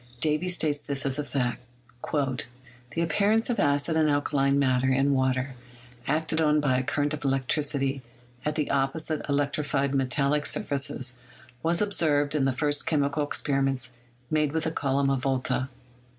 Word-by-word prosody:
Davy 155 +4 +1
states 155 -5 0
this 140 -1 -3
as 135 +1 -1
a - - 0
fact: 125 -4 -2 0.5
"The 125 -1 -3
appearance 205 +8 +2
of 240 - -2
acid 145 +3 +2
and 155 -1 +3
alkaline 140 -1 +1
matter 130 -2 +2
in 135 +2 +2
water 130 0 0 0.5
acted 160 +2 +1
on 150 -1 +3
by 130 -4 +2
a - - -2
current 145 +3 0
of 150 - -5
electricity 135 0 0 0.4
at 150 0 -1
the 150 -2 -1
opposite 140 +3 0
elec 140 0 0
trified 140 -2 0
metallic 140 +2 +1
surfaces 135 -3 -1 0.4
was 170 +4 +1
observed 150 -8 +1
in 145 -3 +1
the 135 - +2
first 145 +2 -1
chemical 145 -1 +1
experiments 135 -3 0 0.4
made 150 -2 +1
with 160 -1 0
the 160 - 0
column 140 -2 +1
of 135 - +1
Volta." 130 -1 -1
140 Hz, 155 wpm, -27 LUFS, 135-150 Hz, 0.5 s, and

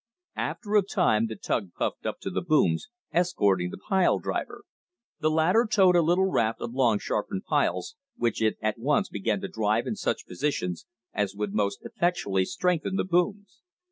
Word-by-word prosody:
After 210 -2 -2
a 210 - +7
time 175 - +2
the 110 - -6
tug 100 -2 -2
puffed - - -2
up - - -4
to - - -4
the - - -1
booms, 155 - +2 0.2
escorting 100 - +2
the - - -8
pile 190 -2 +2
driver. - - -4 0.6
The 155 -1 +2
latter 175 +9 +3
towed 185 -3 +5
a 175 - +6
little 175 +4 +3
raft 115 -12 +1
of 115 - -5
long 120 -5 +3
sharpened 195 - -3
piles, - - 0 0.2
which 120 -2 -1
it 110 -1 +2
at 110 +1 -1
once 145 +5 +1
began 105 0 -1
to - - -3
drive 110 +1 0
in 215 - -2
such 190 - -2
positions 90 - -3 0.3
as 100 -1 -1
would 105 -1 -3
most 100 -2 -1
effectually 100 - 0
strengthen 180 - -1
the - - +1
booms. 200 +5 -1
145 Hz, 175 wpm, -27 LUFS, -, 0.6 s, a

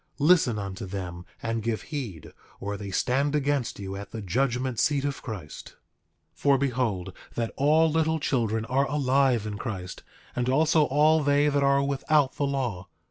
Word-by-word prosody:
Listen 150 -7 +4
unto 95 -1 -5
them 90 -2 -6 0.2
and 115 0 -1
give 115 0 -2
heed, 125 - -6 0.3
or 100 +1 -4
they 100 0 -6
stand 135 +9 +1
against 145 -3 0
you 95 -1 -5
at 100 0 -7
the 115 - -6
judgment 125 +4 0
seat 145 -1 +2
of 140 -1 -3
Christ. 95 - -8 0.6
8:22 - - -38
For 140 -1 +4
behold 120 -9 -1 0.2
that 115 -1 -2
all 155 +3 +4
little 160 0 +1
children 115 -6 0
are 135 +3 +1
alive 135 -5 +2
in 105 -1 -5
Christ, 95 -5 -5 0.3
and 125 0 0
also 155 +3 +4
all 155 +3 +4
they 145 +1 +3
that 145 -1 +1
are 140 0 +3
without 140 0 +1
the 145 - -1
law. 120 -10 -2
130 Hz, 170 wpm, -27 LUFS, 105-145 Hz, 0.6 s, Listen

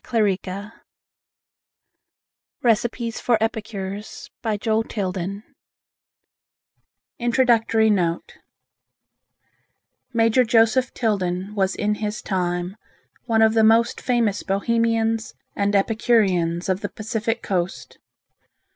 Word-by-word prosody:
JOE 215 -5 +1
TILDEN'S 200 +3 -7 1.9
RECIPES 235 0 0
FOR 240 -2 +3
EPICURES 210 -2 -5
1907 205 -3 -2 1.8
Introductory 235 -2 +3
Note 175 -4 -1 1.7
Major 230 +1 +3
Joseph 230 +2 +3
Tilden 195 -3 -1
was 195 -2 0
in 210 0 0
his 210 +1 -3
time 180 0 -2 0.5
one 225 -2 +3
of 220 0 +4
the 225 -1 +3
most 225 +2 +3
famous 235 -5 +1
Bohemians 225 +2 0 0.2
and 200 0 0
epicureans 195 -5 +2
of 190 +1 0
the - - -3
Pacific 225 +1 -3
Coast. 180 -1 -3
220 Hz, 85 wpm, -22 LUFS, 195-230 Hz, 1.9 s, of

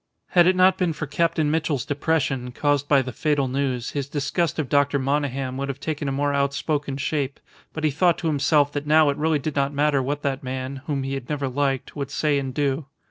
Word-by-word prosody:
Had 175 -1 +5
it 185 - +4
not 185 0 +4
been 175 -3 +1
for 155 - -4
Captain 155 +1 +1
Mitchell's 150 -5 0
depression, 140 -4 -1
caused 145 +2 0
by 140 -2 +4
the 130 - -5
fatal 145 -2 0
news, 130 -2 -2
his 140 -1 -3
disgust 150 +3 -1
of 155 -4 -1
Dr. 145 +1 +2
Monygham 135 -1 -1
would 140 0 -3
have 135 0 -4
taken 150 -2 -3
a - - 0
more 145 +1 0
outspoken 140 0 -1
shape; 140 -1 -2 0.3
but 160 - -6
he 155 - +3
thought 170 +4 +3
to 165 - -3
himself 145 -1 +3
that 145 0 -4
now 155 0 +5
it 140 - -1
really 155 +1 +2
did 145 +1 -4
not 140 0 0
matter 145 -1 +2
what 145 +3 -3
that 135 -2 -1
man, 130 +1 -4
whom 140 -3 -1
he 135 +1 -3
had 135 -3 -5
never 145 -2 -1
liked, 135 0 -1
would 140 -2 -4
say 145 0 +1
and 135 -2 -5
do. 140 0 0
145 Hz, 225 wpm, -24 LUFS, 135-150 Hz, 0.3 s, Had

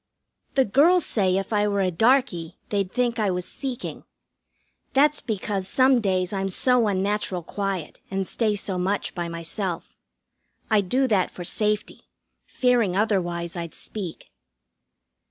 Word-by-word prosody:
The 265 -1 +4
girls 320 - +4
say 190 -4 +1
if 195 +3 -3
I 210 0 +3
were 200 -1 0
a 185 -1 +1
darkey 220 -5 +2
they'd 200 -3 -1
think 245 -1 0
I 210 -2 +2
was 180 -1 -2
seeking. 265 -3 -5 0.9
That's 295 +2 +4
because 200 -3 -3
some 260 +2 +4
days 185 -2 0
I'm 195 0 -1
so 245 +4 +3
unnatural 195 -2 -1
quiet 195 -2 -4
and 195 -1 -2
stay 215 -3 0
so 195 -2 -2
much 195 +3 -1
by 175 -2 -3
myself. 170 +2 -5 0.7
I 215 -2 +5
do 255 +8 +1
that 195 -4 +2
for 180 - -8
safety, 210 +3 -2 0.4
fearing 240 -7 +2
otherwise 175 -5 0
I'd 170 -2 -5
speak. 190 -7 -7
200 Hz, 140 wpm, -24 LUFS, 185-230 Hz, 0.9 s, I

